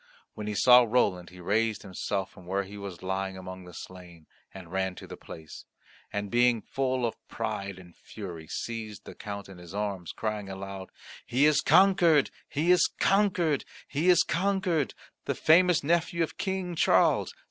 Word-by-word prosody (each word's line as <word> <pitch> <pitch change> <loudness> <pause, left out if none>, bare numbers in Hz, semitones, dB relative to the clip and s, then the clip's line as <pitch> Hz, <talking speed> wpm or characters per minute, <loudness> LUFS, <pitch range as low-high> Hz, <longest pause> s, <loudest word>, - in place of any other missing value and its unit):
When 105 -1 -6
he 105 - -2
saw 125 +4 +8
Roland, 110 -7 +1
he 90 0 -14
raised 110 +4 0
himself 95 0 -3
from 90 -1 -15
where 100 +2 0
he 100 +2 -11
was 100 -4 -8
lying 95 0 -2
among 95 0 -8
the 90 - -11
slain 90 -3 -11 0.3
and 90 -3 -11
ran 95 -1 -1
to - - -10
the - - -9
place, 80 -1 -11 0.5
and, 100 -1 -3
being 120 -2 +3
full 130 -2 -1
of 115 - -1
pride 100 -1 -4
and 90 -2 -14
fury, 85 -7 -9
seized 110 +1 -5
the - - -9
Count 100 -1 -7
in 95 -2 -12
his 90 +2 -11
arms, 100 -4 -3
crying 105 -2 -4
aloud, 95 0 -7 0.3
"He 130 +4 +2
is 150 -1 +4
conquered, 175 -6 +5 0.2
he 160 +5 +1
is 180 - +5
conquered, 185 -7 +2 0.2
he 155 +6 +1
is 175 -2 +6
conquered, 185 -5 0 0.3
the - - -1
famous 175 +1 +4
nephew 170 +2 +1
of 160 - -4
King 190 -2 -2
Charles! - - +3
105 Hz, 170 wpm, -28 LUFS, 95-155 Hz, 0.5 s, saw